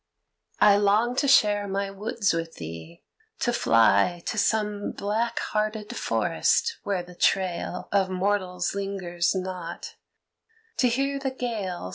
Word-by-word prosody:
I 205 -1 +6
long 210 +4 +2
to 280 - +2
share 205 -5 +4
my 195 0 -2
woods 205 0 -1
with 165 0 -4
thee, 80 0 -9 0.4
to 240 - 0
fly 115 - +3
To - - -2
some 210 -1 0
black 225 +3 -2 0.2
hearted 215 0 -2
forest 460 - +1
where 195 -3 -2
the 180 0 -13
trail 180 0 0
Of 195 -2 +2
mortals 185 -1 -1
lingers 195 -3 -1
not, 185 -2 -5 0.8
to 250 - +3
hear 275 +3 0
the 270 -1 -2
gale. 215 - -4
200 Hz, 130 wpm, -26 LUFS, 180-215 Hz, 0.8 s, I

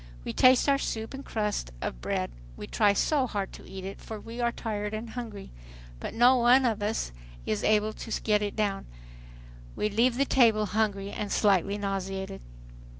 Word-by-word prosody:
We - - -3
taste 255 +1 +5
our 275 -1 +4
soup 225 -1 -3
and 270 +1 -7
crust 210 - -2
of - - -4
bread. - - -2 0.3
We - - -6
try 205 -2 +3
so 270 +5 +2
hard 200 -4 -3
to - - -12
eat 190 -1 -7
it 195 - -7
for 220 -1 -7
we 230 +3 -7
are 235 0 +2
tired 210 -2 -3
and 220 +1 -6
hungry, 225 -5 -7 0.5
but - - -6
no 245 +2 +6
one 250 +2 +5
of 225 -3 0
us 210 - -1 0.3
is 105 -1 -1
able 215 0 +2
to 225 - -4
get 210 -1 +3
it 205 -1 -2
down. 205 -3 -1 0.9
We 210 - 0
leave 235 +4 +2
the 275 - +3
table 225 -6 +4
hungry 205 -1 -1
and 205 -1 -4
slightly 200 -1 +2
nauseated. 195 -1 -4
215 Hz, 185 wpm, -28 LUFS, 200-235 Hz, 0.9 s, no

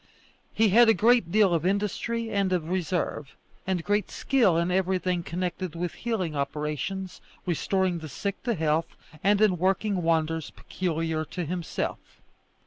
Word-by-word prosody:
He 220 -1 +3
had 230 +4 +6
a 225 - +5
great 230 -6 +3
deal 205 -3 +4
of 165 -2 +1
industry 210 +4 -1
and 200 -2 +1
of 170 -3 -1
reserve, 180 -5 -2 0.3
and 185 -3 0
great 205 +2 0
skill 235 -11 +2
in 170 +2 +1
everything 185 -1 +1
connected 180 0 -4
with 175 0 -3
healing 195 -10 -2
operations, 150 +6 -3 0.2
restoring 185 +1 0
the 160 -1 -8
sick 200 +9 -4
to 235 -3 -1
health, 160 -1 0 0.3
and 200 +2 +4
in 200 -5 +3
working 190 +1 +1
wonders 160 -1 0
peculiar 165 -3 -2
to 175 +2 -5
himself. 170 0 -3
180 Hz, 145 wpm, -27 LUFS, 165-200 Hz, 0.3 s, had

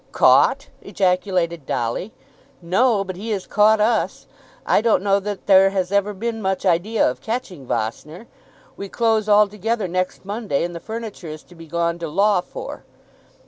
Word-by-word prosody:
"Caught!" - - +4
ejaculated 180 -5 -1
Dolly. 130 - -2 0.5
"No; 195 +5 +2
but 185 -1 -6
he 215 +4 -6
has 200 -4 -2
caught 215 +1 +4
us. 220 +2 0 0.4
I - - +3
don't 220 -4 +2
know 200 0 +3
that 205 0 -6
there 195 -1 +6
has 190 -1 -2
ever 200 +1 +1
been 225 +2 -4
much 190 0 -2
idea 190 +5 +2
of 125 - -3
catching 220 - -5
Vossner. 135 - -4 0.5
We 200 - -7
close 220 -2 +1
altogether 210 +1 +2
next 185 +1 -3
Monday, 205 -7 -2
and 175 0 -4
the 170 - -6
furniture 220 -2 -7
is 155 0 -8
to - - -18
be 165 -1 -13
gone 170 +1 -1
to 170 - -4
law 200 +4 +2
for. - - -8
195 Hz, 165 wpm, -21 LUFS, 170-215 Hz, 0.5 s, there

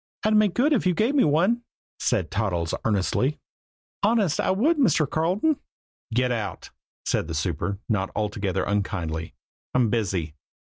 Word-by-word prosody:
"I'd 215 - +3
make 210 -3 +3
good 290 +5 +3
if 225 -8 +2
you 180 - +2
gave 225 +9 +2
me 285 - +4
one," 180 +11 +3 0.4
said 95 -11 0
Toddles 90 -5 -1
earnestly. 110 +7 +1 0.6
"Honest, 205 -6 +2
I - - +1
would, 280 - +2
Mr. 170 - +3
Carleton." 185 - +1 0.5
"Get 125 +2 +1
out!" 110 -4 -4 0.3
said - - 0
the 80 - -4
super, 85 +4 -2
not 95 -4 0
altogether 100 -3 -1
unkindly. 90 -6 -2 0.4
"I'm 120 -4 +3
busy." 95 -9 -1
120 Hz, 145 wpm, -25 LUFS, -, 0.6 s, me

